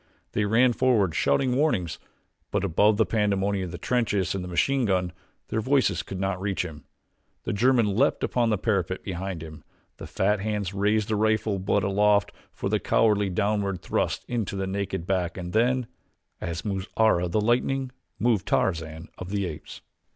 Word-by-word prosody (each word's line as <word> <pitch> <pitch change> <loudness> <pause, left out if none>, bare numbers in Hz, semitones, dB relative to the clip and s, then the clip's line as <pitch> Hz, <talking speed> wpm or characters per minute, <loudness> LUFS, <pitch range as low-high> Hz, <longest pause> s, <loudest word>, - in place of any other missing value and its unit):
They 105 - 0
ran 120 +4 +4
forward, 115 -9 +2
shouting 125 - +2
warnings; 125 - 0 0.5
but - - -1
above 105 +6 +3
the 110 - +4
pandemonium 100 -3 0
of 85 - -7
the - - -6
trenches 105 -7 0
and 95 -2 -3
the - - -6
machine 130 +9 +1
gun 90 -3 +1 0.4
their 110 - -1
voices 130 - +2
could 95 - -7
not 95 -1 -1
reach 95 -2 -1
him. 75 -5 -9 0.6
The - - -2
German 115 -2 +3
leaped 135 +6 +2
upon 120 -2 +1
the 105 - +2
parapet 95 -3 -1
behind 95 -2 -4
him 80 0 -10 0.3
the - - -8
fat 105 +2 +1
hands 105 -2 -2
raised 105 +1 +1
the 110 - 0
rifle 110 -1 +1
butt 95 +1 +1
aloft 105 +1 +3 0.2
for - - -4
the - - +1
cowardly 105 -3 +2
downward 100 -1 -1
thrust - - -1
into 115 -5 -2
the 95 0 -2
naked 95 -2 -3
back 90 -2 -1
and 90 -1 -6
then, 125 +3 +2 0.5
as 85 -1 -4
moves 95 -2 -2
Ara, 110 -6 +3
the 85 +5 0
lightning, 125 +4 +1 0.3
moved 115 -6 +1
Tarzan 80 -2 -1
of 90 - -6
the 100 -1 -1
Apes. 80 -4 -8
100 Hz, 175 wpm, -26 LUFS, 90-110 Hz, 0.6 s, ran